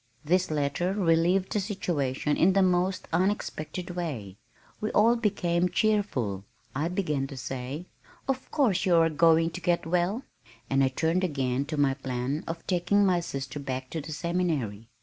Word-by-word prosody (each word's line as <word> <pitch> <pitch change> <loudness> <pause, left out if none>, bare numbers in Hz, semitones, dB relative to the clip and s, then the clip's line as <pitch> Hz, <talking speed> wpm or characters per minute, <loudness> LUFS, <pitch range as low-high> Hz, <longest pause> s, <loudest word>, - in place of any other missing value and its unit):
This 180 +4 +2
letter 150 +5 0
relieved 180 0 +2
the 210 - +1
situation 155 - -1
in 185 +3 +4
the 195 0 +4
most 185 +1 +1
unexpected 180 -1 -1
way. 135 - -5 0.4
We 215 - -2
all 230 +3 +5
became 180 -6 +1
cheerful. 170 - 0 0.3
I 150 +4 0
began 150 -7 -1
to 135 - -9
say, 130 +6 -5 0.4
"Of 265 -1 -2
course 245 - +2
you 180 -2 +4
are 165 -1 +4
going 165 +1 +4
to 180 - -7
get 175 -1 +1
well," 180 +8 0 0.5
and 135 0 +4
I - - +4
turned 165 +7 0
again 135 -5 0
to 155 +1 -4
my 140 -2 +3
plan 135 +2 -3
of 165 0 -5
taking 190 +3 +2
my 180 -2 +3
sister 135 -4 -5
back 130 -2 -5
to 160 - -3
the 155 +2 -8
seminary. 150 - -2
165 Hz, 165 wpm, -28 LUFS, 140-185 Hz, 0.5 s, all